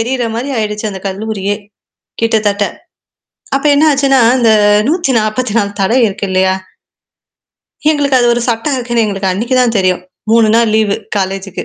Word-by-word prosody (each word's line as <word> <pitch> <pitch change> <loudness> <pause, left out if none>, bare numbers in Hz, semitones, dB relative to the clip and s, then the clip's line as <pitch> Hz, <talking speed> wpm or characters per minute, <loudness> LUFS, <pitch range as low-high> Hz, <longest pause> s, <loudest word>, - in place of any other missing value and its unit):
எரியிற 245 +1 -1
மாரி 250 +5 -3
ஆயிடுச்சு 210 0 -3
அந்த 190 - -7
கல்லூரியே, 205 0 -3 0.7
கிட்டத்தட்ட. 210 -3 +1 0.9
அப்ப 275 - -2
என்ன 300 +2 +3
ஆச்சுன்னா, 270 -2 +2 0.2
இந்த 230 -2 +4 0.4
144 230 - 0
தடை 225 +7 +2
இருக்கு 200 0 -4
இல்லையா? 190 0 +2 1.4
எங்களுக்கு 280 -3 +2
அது 240 - +2
ஒரு 240 - -1
சட்டம் 235 +5 -1
இருக்குன்னு 240 -2 0
எங்களுக்கு 195 -2 -2
அன்னைக்கு 235 +7 -1
தான் 235 -2 +1
தெரியும். 185 -1 0 0.3
3 230 -1 +4
நாள் 230 -2 +2
லீவு 215 -2 +1 0.2
காலேஜ்க்கு. 195 0 -4
220 Hz, 140 wpm, -13 LUFS, 200-250 Hz, 1.4 s, இந்த